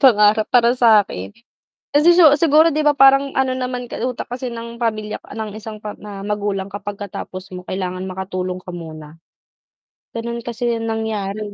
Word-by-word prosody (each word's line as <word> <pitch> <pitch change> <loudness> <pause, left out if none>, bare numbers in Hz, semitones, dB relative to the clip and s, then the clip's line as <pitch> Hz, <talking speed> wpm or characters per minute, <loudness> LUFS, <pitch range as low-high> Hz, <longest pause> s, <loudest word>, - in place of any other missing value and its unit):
pangarap 210 -3 +5
para 240 0 +4
sakin. 205 - +3 0.6
Kasi 315 +4 +5
si 355 - +7 0.2
siguro, 320 0 +5
'di 305 - 0
ba, 295 -1 +3
parang 275 0 +5
ano 265 -1 +2
naman 250 -1 -3
ka 245 - -7
utak 250 +1 -2
kasi 250 +1 -4
ng 235 0 -8
pamilya 215 -2 -2
k - - -12
ng 220 -2 -4
isang 215 +1 -8
pa 210 0 -7
na 200 -2 -8
magulang, 200 -2 -2
kapag 205 0 -5
katapos 190 -1 -8
mo 180 0 -9
kailangan 185 0 -3
makatulong 185 -1 -4
ka 180 - -8
muna? 160 -2 -9 0.9
Ganun 235 0 -5
kasi 240 0 -3
yung 230 -1 -1
nangyari 220 -2 -3
220 Hz, 170 wpm, -20 LUFS, 195-245 Hz, 0.9 s, si